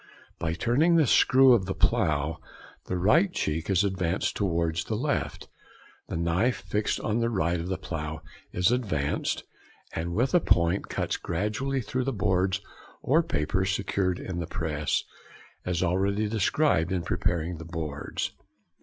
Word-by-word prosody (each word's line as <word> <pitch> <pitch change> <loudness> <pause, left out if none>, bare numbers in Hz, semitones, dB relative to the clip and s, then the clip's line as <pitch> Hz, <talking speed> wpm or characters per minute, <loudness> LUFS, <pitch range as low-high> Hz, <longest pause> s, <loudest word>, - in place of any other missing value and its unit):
By 80 -1 -1
turning 135 - +2
the 160 -3 +5
screw 130 +1 +6
of 95 -6 +2
the 95 - -2
plough 75 +1 +1 0.5
the 90 - -1
right 155 - +4
cheek 80 - -2
is 95 0 +3
advanced 95 -2 -1
towards 85 -4 0
the - - -2
left; - - -2 0.6
the - - -4
knife 85 +9 +1
fixed 105 +1 -1
on 110 +2 0
the 115 0 +1
right 85 -5 0
of 85 - -4
the 95 - -2
plough 80 -2 -5 0.3
is 90 +5 +2
advanced, 80 - -1 0.5
and 85 +2 -3
with 125 +4 +2
the 175 - +5
point 85 - +2
cuts - - -1
gradually 105 +10 -2
through 125 +2 -2
the 135 - 0
boards 95 -2 +1 0.4
or 155 +6 +4
paper 90 - -1
secured 95 -1 0
in 90 -2 -5
the 85 - -3
press, 75 -2 -1 0.6
as 90 -1 0
already 100 +4 +1
described 105 - +1
in 90 -2 -1
preparing 85 0 -1
the - - -7
boards. 80 -3 -4
95 Hz, 155 wpm, -27 LUFS, 85-110 Hz, 0.6 s, screw